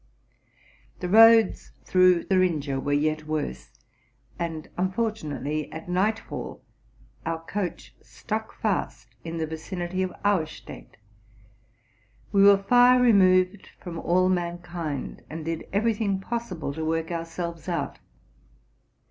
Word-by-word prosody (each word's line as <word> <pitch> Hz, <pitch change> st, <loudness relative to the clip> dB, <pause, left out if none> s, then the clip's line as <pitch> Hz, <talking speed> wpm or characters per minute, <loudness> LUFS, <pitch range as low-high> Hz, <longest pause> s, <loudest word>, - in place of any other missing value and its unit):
The 180 Hz, -, -3 dB
roads 225 Hz, 0 st, +6 dB
through 185 Hz, -2 st, +4 dB
Thuringia 160 Hz, -8 st, +1 dB
were 145 Hz, -, -3 dB
yet 155 Hz, +1 st, 0 dB
worse; 65 Hz, -, -3 dB, 0.7 s
and 165 Hz, -2 st, -4 dB
unfortu 205 Hz, +2 st, -1 dB
nately, 150 Hz, +1 st, -3 dB
at 160 Hz, +2 st, -8 dB
night 200 Hz, +5 st, +1 dB
fall, -, -, -8 dB, 0.6 s
our 165 Hz, 0 st, -2 dB
coach 195 Hz, -2 st, -4 dB
stuck -, -, -5 dB
fast -, -, -2 dB
in 165 Hz, 0 st, -5 dB
the 160 Hz, -, -1 dB
vicinity 175 Hz, +3 st, -4 dB
of 185 Hz, -1 st, -1 dB
Auerstadt. 155 Hz, -, -2 dB, 1.3 s
We 200 Hz, -, +4 dB
were 200 Hz, 0 st, +6 dB
far 245 Hz, +4 st, +6 dB
removed 190 Hz, -5 st, +4 dB
from 170 Hz, -3 st, -7 dB
all 185 Hz, +2 st, +2 dB
mankind, 175 Hz, -5 st, -3 dB
and 155 Hz, 0 st, -6 dB
did 165 Hz, 0 st, -3 dB
every 225 Hz, +4 st, +2 dB
thing 200 Hz, -3 st, -1 dB
possible 195 Hz, -9 st, -4 dB
to 160 Hz, +2 st, -5 dB
work 165 Hz, +1 st, -1 dB
ourselves 170 Hz, +1 st, -5 dB
out. 170 Hz, -, -3 dB
175 Hz, 120 wpm, -26 LUFS, 160-195 Hz, 1.3 s, roads